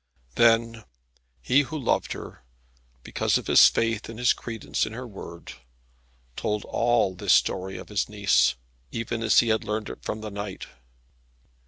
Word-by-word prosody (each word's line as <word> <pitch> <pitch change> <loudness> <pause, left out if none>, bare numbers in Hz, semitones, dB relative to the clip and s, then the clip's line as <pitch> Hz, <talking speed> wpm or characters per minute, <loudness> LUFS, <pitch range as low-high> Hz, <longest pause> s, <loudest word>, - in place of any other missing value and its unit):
Then 115 - +3 0.6
he 135 +3 +4
who 155 +2 -5
loved 130 -5 0
her, - - -10 0.6
because - - 0
of - - -6
his - - +7
faith 115 -1 -1
and 115 - -8
his 120 0 +3
credence 115 -2 -4
in - - -8
her 125 +2 -6
word, 85 -5 -10 0.8
told 105 -1 -2
all 115 -5 +1
this 90 - +1
story 95 +1 +1
of - - -10
his 105 -1 -1
niece, 100 -10 +2 0.4
even 115 0 -4
as 115 - +5
he 120 - -2
had 110 0 +1
learned 105 0 -3
it - - -9
from 110 - -5
the 110 -1 -6
knight. 100 -1 -6
110 Hz, 160 wpm, -25 LUFS, 105-115 Hz, 0.8 s, his